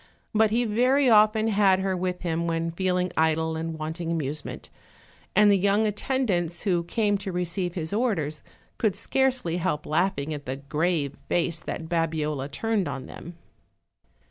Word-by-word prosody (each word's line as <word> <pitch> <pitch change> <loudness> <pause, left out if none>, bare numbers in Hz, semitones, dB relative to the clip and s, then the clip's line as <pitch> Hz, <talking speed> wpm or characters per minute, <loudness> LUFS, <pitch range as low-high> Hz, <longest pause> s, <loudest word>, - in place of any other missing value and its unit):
But 220 0 +4
he 235 +3 +1
very 250 +4 +3
often 215 +1 +5
had 195 -3 +4
her 190 -1 0
with 180 0 -3
him 170 -1 -1
when 165 0 -1
feeling 180 +1 0
idle 160 0 +1
and 160 0 -4
wanting 160 +2 -4
amusement, 150 -2 -4 0.6
and 210 +1 +6
the 200 - +5
young 200 +3 +3
attendants 205 -7 -1
who 175 -4 +1
came 205 +1 +1
to 195 -1 -4
receive 175 0 -2
his 160 0 -3
orders 195 - -1 0.4
could 210 -4 +1
scarcely 250 -5 0
help 170 -4 -1
laughing 155 -2 0
at 145 -2 -7
the 130 - -2
grave 145 +1 -1
face 170 -1 0
that 160 - -5
Babiola 155 -4 -1
turned 220 +1 -1
on 135 -2 -5
them. 170 +1 -10
175 Hz, 155 wpm, -26 LUFS, 160-210 Hz, 0.6 s, and